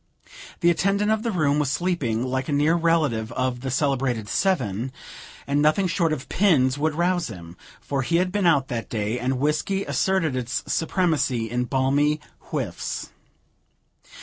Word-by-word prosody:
The 170 0 +5
attendant 200 +5 +1
of 220 -1 +1
the 230 - -2
room 150 -7 +1
was 145 -2 0
sleeping 145 -10 0
like 130 +2 -2
a - - 0
near 150 +3 +3
relative 160 -10 +1
of 130 -1 -1
the 135 - -3
celebrated 130 -5 0
Seven, 130 - 0 0.5
and 140 +1 +1
nothing 155 +6 +3
short 170 -2 +1
of 140 -3 -3
pins 145 -10 +3
would 150 +1 -1
rouse 175 0 +1
him; 85 -5 -10 0.2
for 140 -1 -2
he 165 +6 -1
had 180 +1 +2
been 200 -2 +1
out 140 -5 +3
that 120 -3 -4
day, 110 +2 -2
and 130 +2 -1
whiskey 150 +8 0
asserted 185 -7 0
its 120 -2 -2
supremacy 155 - 0
in 125 +1 0
balmy 140 +4 +1 0.3
whiffs. - - -4
145 Hz, 160 wpm, -24 LUFS, 125-170 Hz, 0.5 s, The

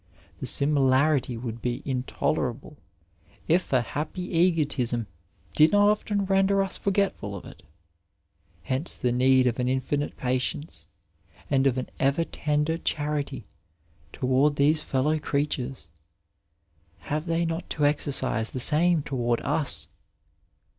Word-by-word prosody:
The - - -2
simi 145 0 +3
larity 130 -2 +2
would 115 -1 -6
be 125 +4 -3
intolerable, 130 +1 -2 0.7
if 175 +3 +1
a 130 -2 +3
happy 165 +8 -5
egotism 145 -9 +1 0.5
did 155 +1 +5
not 205 0 +5
often 205 -1 -1
render 195 0 +2
us 190 - -1
forgetful 195 - -1
of 95 - -9
it. - - -13 1.0
Hence 130 +6 -1
the 125 - -1
need 130 +1 +4
of 125 0 0
an 125 - 0
infinite 130 +3 -2
patience 125 - -3 0.6
and 135 -1 +3
of 130 -1 0
an 130 - -4
ever 140 +5 +2
tender 150 +1 -1
charity 145 -6 -2 0.7
toward 130 +6 +1
these 150 +2 +3
fellow 150 +4 0
creatures; 140 -5 -2 1.1
have 150 - -4
they 165 +1 0
not 165 +1 -4
to 150 - 0
exercise 140 -6 +1
the 130 - -3
same 160 +4 +5
toward 120 -4 -1
us 145 +1 0
145 Hz, 125 wpm, -26 LUFS, 130-160 Hz, 1.1 s, did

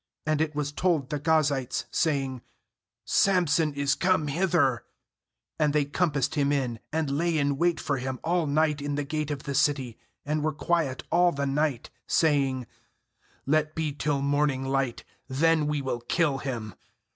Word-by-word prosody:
2[And 155 0 +1
it 155 -1 -1
was 145 -1 -2
told] 155 -4 0
the 150 - -1
Ga 160 +2 +3
zites, 135 -4 -2
saying 135 -5 0 0.4
' - - -64 0.2
Samson 170 -5 +2
is 140 0 +1
come 180 -5 +1
hither/ 160 -6 +1 0.8
And 150 -2 +2
they 150 -1 +2
compassed 145 -1 0
him 140 -1 +1
in, 130 -5 -1
and 155 -3 -1
lay 165 +1 +1
in 140 -1 +1
wait 170 +4 +1
for 140 -1 -1
him 130 0 -4
all 170 -1 +1
night 150 0 +1
in 145 0 -2
the 145 - -1
gate 150 +1 -3
of 145 -2 -4
the 140 - -4
city, 135 -4 0 0.3
and 150 +1 -1
were 155 0 0
quiet 145 -4 -1
all 175 0 +4
the 140 -3 -2
night, 140 -2 -1 0.2
saying: 135 -5 +2 0.8
'Let 155 +2 +1
be 155 -3 -1
till 145 -1 -1
morning 140 -2 +1
light, 135 -2 -1 0.2
then 155 +3 +2
we 150 -2 -1
will 130 -2 -2
kill 140 +3 0
him.' 115 -7 -5
145 Hz, 170 wpm, -27 LUFS, 135-155 Hz, 0.8 s, all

